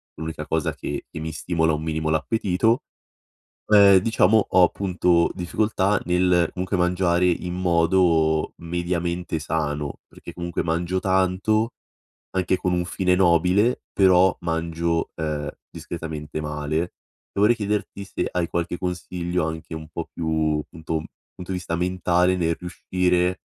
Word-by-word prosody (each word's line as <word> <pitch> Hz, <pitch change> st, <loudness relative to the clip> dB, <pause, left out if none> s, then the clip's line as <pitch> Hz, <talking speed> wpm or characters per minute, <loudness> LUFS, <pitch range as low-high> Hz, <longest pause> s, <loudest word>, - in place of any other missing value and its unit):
l'unica 80 Hz, +1 st, -6 dB
cosa -, -, 0 dB
che -, -, -5 dB
mi 80 Hz, +1 st, -4 dB
stimola 80 Hz, 0 st, 0 dB
un 75 Hz, +1 st, -2 dB
minimo 80 Hz, -1 st, -2 dB
l'appetito, 100 Hz, +7 st, +1 dB, 0.8 s
uhm, 100 Hz, -2 st, +7 dB
diciamo 110 Hz, 0 st, +3 dB
ho 95 Hz, -, +5 dB
appunto 90 Hz, -2 st, +2 dB
difficoltà 100 Hz, +2 st, 0 dB
nel 90 Hz, -1 st, +3 dB
comunque, 95 Hz, +1 st, -2 dB
mangiare 90 Hz, 0 st, +2 dB
in 90 Hz, 0 st, -1 dB
modo 85 Hz, -3 st, +2 dB
mediamente 85 Hz, 0 st, -2 dB
sano. 75 Hz, -2 st, -3 dB
Perché -, -, -11 dB
comunque 85 Hz, -1 st, -3 dB
mangio 85 Hz, +2 st, -1 dB
tanto, 95 Hz, +5 st, +1 dB, 0.6 s
anche 95 Hz, 0 st, +1 dB
con 90 Hz, -, -1 dB
un 90 Hz, 0 st, 0 dB
fine 90 Hz, 0 st, +1 dB
nobile, 95 Hz, +6 st, +3 dB
però 95 Hz, -1 st, +5 dB
mangio, 85 Hz, 0 st, -1 dB
uhm, 75 Hz, -2 st, -3 dB, 0.2 s
discretamente 80 Hz, -2 st, -6 dB
male. 75 Hz, +3 st, -2 dB, 0.4 s
E -, -, +2 dB
vorrei 105 Hz, +4 st, +5 dB
chiederti 105 Hz, -1 st, -3 dB
se 100 Hz, -, -3 dB
hai 90 Hz, -2 st, -1 dB
qualche 85 Hz, 0 st, -2 dB
consiglio 90 Hz, -1 st, -2 dB
anche 80 Hz, 0 st, -5 dB
un 80 Hz, 0 st, -8 dB
po' -, -, -6 dB
più, 80 Hz, -2 st, 0 dB
punto 80 Hz, -1 st, -4 dB, 0.3 s
punto 90 Hz, +1 st, -7 dB
di 90 Hz, -, -2 dB
vista 85 Hz, -1 st, -3 dB
mentale 90 Hz, +1 st, +1 dB
nel 85 Hz, -2 st, 0 dB
riuscire 90 Hz, 0 st, 0 dB
90 Hz, 130 wpm, -23 LUFS, 80-95 Hz, 0.8 s, uhm